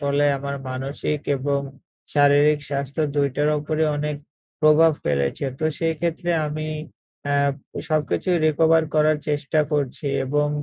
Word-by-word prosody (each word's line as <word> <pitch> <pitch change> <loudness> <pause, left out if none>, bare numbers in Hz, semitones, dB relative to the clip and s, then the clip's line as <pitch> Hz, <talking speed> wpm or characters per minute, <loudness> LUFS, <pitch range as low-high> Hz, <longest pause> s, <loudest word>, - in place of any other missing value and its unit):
ফলে 140 0 +1
আমার 140 0 -4
মানসিক 140 +3 -3 0.2
এবং 140 +1 0 0.5
শারীরিক 145 +1 +4
স্বাস্থ্য 140 +2 -2
২ 140 -1 +2
টার 145 +1 +2
উপরে 155 +1 -1
অনেক 150 0 -2 0.4
প্রভাব 155 +1 +6
ফেলেছে। 70 - 0
তো 155 - -2
সেই 165 -1 0
ক্ষেত্রে 170 0 -1 0.2
আমি 155 +1 -4 0.6
আ - - +2 0.5
সবকিছুই 155 +3 +1
রিকভার 160 +1 +4
করার 155 0 +4
চেষ্টা 150 +1 +1
করছি। 145 +1 -2 0.2
এবং 145 +2 +1
150 Hz, 130 wpm, -23 LUFS, 140-155 Hz, 0.6 s, প্রভাব